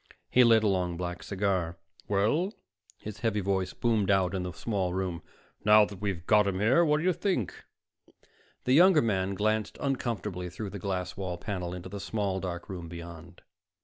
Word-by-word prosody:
He 125 Hz, -, +6 dB
lit 115 Hz, -2 st, +5 dB
a -, -, +3 dB
long 90 Hz, -3 st, 0 dB
black 90 Hz, 0 st, -4 dB
cigar. 95 Hz, -4 st, -1 dB, 0.3 s
"Well?" 115 Hz, -, +1 dB, 0.4 s
His 105 Hz, -1 st, -8 dB
heavy 110 Hz, -3 st, 0 dB
voice 95 Hz, -1 st, 0 dB
boomed 110 Hz, -4 st, +1 dB
out 95 Hz, -2 st, +3 dB
in 95 Hz, -, -1 dB
the 90 Hz, 0 st, -4 dB
small 95 Hz, -1 st, -2 dB
room. 90 Hz, -3 st, -2 dB, 0.4 s
"Now 105 Hz, 0 st, +7 dB
that 100 Hz, -2 st, -10 dB
we've 95 Hz, -5 st, -3 dB
got 105 Hz, 0 st, +4 dB
him 95 Hz, -1 st, -1 dB
here, 120 Hz, +11 st, +4 dB
what 150 Hz, -2 st, +3 dB
do 155 Hz, -, -2 dB
you 185 Hz, 0 st, +3 dB
think?" 175 Hz, -, -1 dB, 1.1 s
The 125 Hz, -, +2 dB
younger 175 Hz, 0 st, +6 dB
man 95 Hz, -3 st, 0 dB
glanced 110 Hz, +2 st, 0 dB
uncomfortably 105 Hz, -9 st, -2 dB
through 95 Hz, +3 st, -6 dB
the 100 Hz, -, -6 dB
glass 90 Hz, -1 st, -3 dB
wall 90 Hz, -2 st, -4 dB
panel 90 Hz, -2 st, -4 dB
into 90 Hz, 0 st, -7 dB
the 100 Hz, +2 st, -7 dB
small 100 Hz, -2 st, -2 dB
dark 90 Hz, -2 st, -5 dB
room 90 Hz, -3 st, -6 dB
beyond. 85 Hz, 0 st, -10 dB
100 Hz, 180 wpm, -29 LUFS, 90-110 Hz, 1.1 s, Now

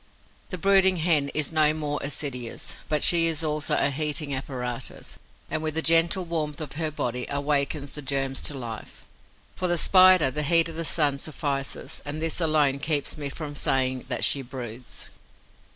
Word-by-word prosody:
The 185 Hz, -, -3 dB
brooding 190 Hz, 0 st, +4 dB
Hen 155 Hz, -4 st, +2 dB
is 150 Hz, 0 st, +1 dB
no 155 Hz, -1 st, +3 dB
more 150 Hz, -2 st, -3 dB
assiduous, 135 Hz, -4 st, -5 dB
but 150 Hz, -1 st, +2 dB
she 165 Hz, -1 st, +7 dB
is 165 Hz, -1 st, +1 dB
also 150 Hz, -1 st, 0 dB
a 140 Hz, -, +2 dB
heating 150 Hz, 0 st, +1 dB
apparatus 130 Hz, -2 st, -6 dB, 0.3 s
and, 155 Hz, +1 st, -3 dB
with 155 Hz, -1 st, -3 dB
the 160 Hz, -, +1 dB
gentle 165 Hz, +3 st, +4 dB
warmth 155 Hz, -3 st, -3 dB
of 150 Hz, -3 st, -6 dB
her 160 Hz, +1 st, -2 dB
body, 125 Hz, -4 st, -3 dB
awakens 140 Hz, 0 st, -1 dB
the 150 Hz, -, -7 dB
germs 135 Hz, -1 st, -2 dB
to 145 Hz, -, -8 dB
life. 115 Hz, -4 st, -9 dB, 0.5 s
For 185 Hz, -, -1 dB
the 175 Hz, 0 st, +1 dB
Spider, 185 Hz, -5 st, +6 dB
the 150 Hz, -, 0 dB
heat 165 Hz, +2 st, +4 dB
of 165 Hz, -, -8 dB
the 165 Hz, 0 st, -4 dB
sun 145 Hz, -3 st, +1 dB
suffices; 140 Hz, -2 st, -4 dB
and 145 Hz, +2 st, -6 dB
this 165 Hz, +2 st, -2 dB
alone 150 Hz, -4 st, +1 dB
keeps 150 Hz, -1 st, -1 dB
me 145 Hz, -2 st, -5 dB
from 145 Hz, 0 st, -7 dB
saying 130 Hz, -2 st, -1 dB
that 120 Hz, -2 st, -2 dB
she 140 Hz, -, +1 dB
'broods.' 125 Hz, -2 st, -9 dB
150 Hz, 175 wpm, -25 LUFS, 135-160 Hz, 0.5 s, she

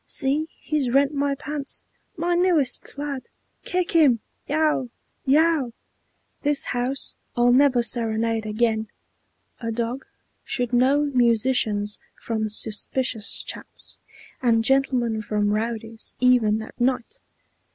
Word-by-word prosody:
See, 290 Hz, +3 st, 0 dB
he's 300 Hz, -5 st, -1 dB
rent 275 Hz, +3 st, +3 dB
my 280 Hz, 0 st, 0 dB
pants, 290 Hz, 0 st, -5 dB, 0.3 s
My 345 Hz, +2 st, 0 dB
newest 345 Hz, -8 st, +2 dB
plaid! 280 Hz, -2 st, -6 dB, 0.3 s
Kick 360 Hz, -1 st, -1 dB
him!" 290 Hz, -9 st, +5 dB, 0.3 s
"Yow, 300 Hz, -4 st, +1 dB, 0.4 s
yow!" 295 Hz, -3 st, +3 dB, 0.7 s
"This 290 Hz, -1 st, +1 dB
house 250 Hz, +2 st, -2 dB, 0.2 s
I'll 240 Hz, 0 st, +4 dB
never 255 Hz, -2 st, +4 dB
serenade 225 Hz, -2 st, 0 dB
again! 220 Hz, 0 st, 0 dB, 0.7 s
A 230 Hz, -1 st, -3 dB
dog 235 Hz, +3 st, -3 dB, 0.4 s
Should 245 Hz, -2 st, -3 dB
know 260 Hz, +4 st, +4 dB
musicians 235 Hz, -5 st, +2 dB, 0.2 s
from 220 Hz, -2 st, -2 dB
suspicious 220 Hz, +2 st, +1 dB
chaps, -, -, -9 dB, 0.4 s
And 230 Hz, -3 st, +3 dB
gentlemen 245 Hz, -3 st, +1 dB
from 210 Hz, -1 st, 0 dB
rowdies, 225 Hz, +1 st, -4 dB
even 225 Hz, -4 st, +3 dB
at 225 Hz, -, -12 dB
night!" 255 Hz, -, 0 dB
250 Hz, 110 wpm, -24 LUFS, 225-280 Hz, 0.7 s, him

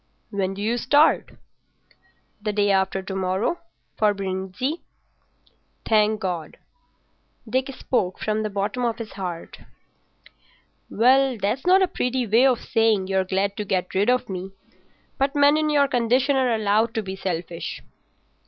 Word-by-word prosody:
"When 195 Hz, -2 st, -2 dB
do 200 Hz, -, -5 dB
you 235 Hz, +3 st, 0 dB
start?" 290 Hz, +6 st, +3 dB, 1.1 s
"The 210 Hz, 0 st, -1 dB
day 205 Hz, -1 st, +2 dB
after 190 Hz, 0 st, +1 dB
to 190 Hz, 0 st, -6 dB
morrow—for 205 Hz, -, -2 dB
Brindisi." 195 Hz, -, -3 dB, 1.0 s
"Thank 215 Hz, -1 st, +3 dB
God." 175 Hz, -6 st, -4 dB, 0.9 s
Dick 260 Hz, +4 st, -1 dB
spoke 190 Hz, -8 st, -1 dB
from 215 Hz, 0 st, -1 dB
the 215 Hz, -, -2 dB
bottom 205 Hz, +5 st, -2 dB
of 235 Hz, -2 st, 0 dB
his 225 Hz, -3 st, -7 dB
heart. 180 Hz, -4 st, -6 dB, 1.3 s
"Well, 260 Hz, +2 st, +3 dB
that's 220 Hz, -, -2 dB
not 380 Hz, +1 st, +6 dB
a -, -, +2 dB
pretty 255 Hz, -7 st, -1 dB
way 230 Hz, +5 st, +4 dB
of 250 Hz, -3 st, +1 dB
saying 220 Hz, -4 st, +1 dB
you're 190 Hz, -1 st, +2 dB
glad 195 Hz, +2 st, -1 dB
to 210 Hz, -, -2 dB
get 185 Hz, -2 st, -2 dB
rid 200 Hz, +5 st, +2 dB
of 250 Hz, 0 st, +1 dB
me. 190 Hz, 0 st, -5 dB, 0.7 s
But 275 Hz, +1 st, +1 dB
men 285 Hz, +1 st, +5 dB
in 310 Hz, 0 st, +1 dB
your 285 Hz, -2 st, +3 dB
condition 250 Hz, +3 st, +2 dB
are 260 Hz, -2 st, +2 dB
allowed 220 Hz, +2 st, +1 dB
to 220 Hz, -, -1 dB
be 190 Hz, -1 st, -5 dB
selfish." 175 Hz, -3 st, -5 dB
215 Hz, 145 wpm, -23 LUFS, 190-255 Hz, 1.3 s, not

